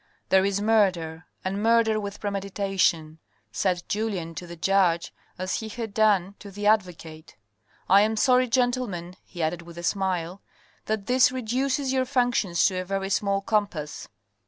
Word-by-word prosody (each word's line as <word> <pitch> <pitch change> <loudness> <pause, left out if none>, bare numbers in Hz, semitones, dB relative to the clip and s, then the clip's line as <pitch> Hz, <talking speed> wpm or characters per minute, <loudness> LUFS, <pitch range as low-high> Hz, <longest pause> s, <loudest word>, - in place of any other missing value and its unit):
"There 190 0 +5
is 200 0 0
murder, 185 -6 +1 0.2
and 195 +2 -2
murder 225 -1 +3
with 200 -1 -6
premeditation," 195 -5 -1 0.3
said 180 -2 -1
Julien 200 -6 -2
to 175 +2 -8
the 170 - -8
judge 175 -1 +1 0.2
as 185 0 -2
he 220 - -6
had 220 -1 -6
done 200 -3 +2
to 205 - -10
the 205 +1 -6
advocate, 170 - -1 0.3
" - - -36
I 195 +2 +6
am 220 +1 +1
sorry, 255 +1 +4
gentlemen, 245 -8 -1
he 175 -3 -6
added 160 +2 -1
with 170 0 -13
a 170 - -7
smile, 185 -1 -1 0.4
that 215 -2 -2
this 255 +2 +4
reduces 260 +2 -1
your 260 -1 +1
functions 245 - +1
to 190 -1 +1
a - - -5
very 195 +1 -3
small 200 0 +1
compass." 200 -8 -2
195 Hz, 160 wpm, -25 LUFS, 175-220 Hz, 0.4 s, I